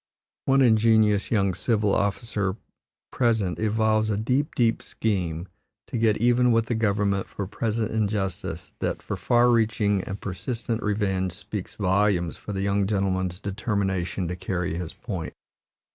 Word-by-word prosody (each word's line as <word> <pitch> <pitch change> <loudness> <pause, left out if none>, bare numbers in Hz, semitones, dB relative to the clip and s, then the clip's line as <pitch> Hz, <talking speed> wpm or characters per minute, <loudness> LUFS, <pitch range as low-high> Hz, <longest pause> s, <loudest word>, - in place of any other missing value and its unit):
One 135 0 +4
ingenious 110 -3 +4
young 100 -4 +2
civil 105 +1 +1
officer 100 -2 0 0.6
present 110 -7 +1
evolves 110 0 +2
a 105 - 0
deep, 130 +7 0
deep 115 -2 +2
scheme 90 -5 -2 0.4
to - - -7
get 110 -2 +3
even 120 +2 +3
with 115 -1 +3
the 120 - -1
government 100 -3 +1
for 100 - -5
present 110 +2 -2
injustice 100 -5 -2
that - - -2
for - - -3
far 120 0 +3
reaching 105 -4 +2
and 100 - -5
persistent 115 +4 -3
revenge 95 -3 0
speaks 100 +1 -6
volumes 95 -3 +1
for - - -8
the 95 -1 -2
young 100 0 +1
gentleman's 95 -3 0
determination 95 -3 -2
to 90 - -3
carry 90 0 -2
his 85 -1 -4
point. 95 -9 -5
105 Hz, 145 wpm, -25 LUFS, 95-110 Hz, 0.6 s, One